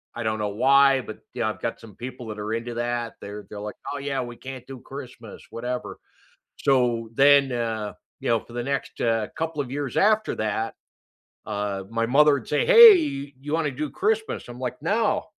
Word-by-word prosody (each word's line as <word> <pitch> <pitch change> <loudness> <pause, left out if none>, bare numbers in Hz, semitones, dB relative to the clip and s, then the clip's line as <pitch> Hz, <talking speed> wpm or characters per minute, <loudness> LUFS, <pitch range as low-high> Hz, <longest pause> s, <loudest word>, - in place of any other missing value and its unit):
I 120 - -4
don't 110 -1 -1
know 105 - -1
why, 135 +5 +4
but, 110 - -9
you 125 - -4
know, 110 - +1
I've 110 - -6
got 115 - -3
some 110 -4 -14
people 125 -1 -8
that 105 -1 -6
are 105 +2 -3
into 115 +1 -3
that, 120 -1 -2
they're 105 +1 -8
they're 105 - -7
like, 105 0 -6 0.2
"Oh 145 - -4
yeah, 140 -1 -2
we 120 -1 -7
can't 130 -2 -8
do 135 -2 -8
Christmas," 125 -5 -10
whatever, 125 +2 -5 0.6
so, 120 -4 +1
then, 140 0 +5
uh, 110 -3 -2 0.3
you - - -3
know, 115 -1 +3
for 120 - -15
the 120 - -2
next, 140 +2 -3
uh, 115 -2 +1
couple 160 -2 -2
of 130 -3 -4
years 140 -2 -4
after 215 +1 +3
that, 110 +1 -2 0.7
uh, 100 -2 -3
my 115 0 0
mother 145 +3 +5
would 140 - -4
say, - - +1
"Hey, 360 - +7
you 145 +2 -6
wanna 160 -2 +1
do 145 +2 -4
Christmas?" 220 +1 -1
I'm 120 +1 -9
like, 125 -1 -4
"No, 205 +3 +1
125 Hz, 205 wpm, -25 LUFS, 115-140 Hz, 0.7 s, Hey